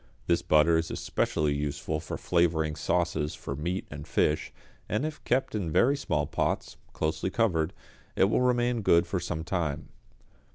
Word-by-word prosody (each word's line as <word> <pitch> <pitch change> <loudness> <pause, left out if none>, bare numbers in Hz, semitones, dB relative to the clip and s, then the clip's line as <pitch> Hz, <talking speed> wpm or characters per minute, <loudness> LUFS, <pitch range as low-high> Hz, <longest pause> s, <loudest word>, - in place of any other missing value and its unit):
This 85 -1 +2
butter 80 0 +4
is 80 - -3
especially 75 -1 0
useful 75 +1 -2
for - - -5
flavouring 80 -3 +1
sauces 85 -4 0
for 70 - -5
meat 85 +6 -3
and 75 0 -8
fish, 75 +1 +1 0.4
and 110 +9 0
if 155 -1 -5
kept 130 +2 +1
in 95 -7 -2
very 135 - +4
small 75 - -1
pots, - - -2
closely 80 +3 -1
covered, 90 -7 +1 0.4
it - - +4
will 100 +5 +3
remain 120 -1 +2
good 85 -3 +4
for 90 +2 -2
some 85 -2 -3
time. 80 -4 -2
85 Hz, 160 wpm, -28 LUFS, 75-100 Hz, 0.4 s, butter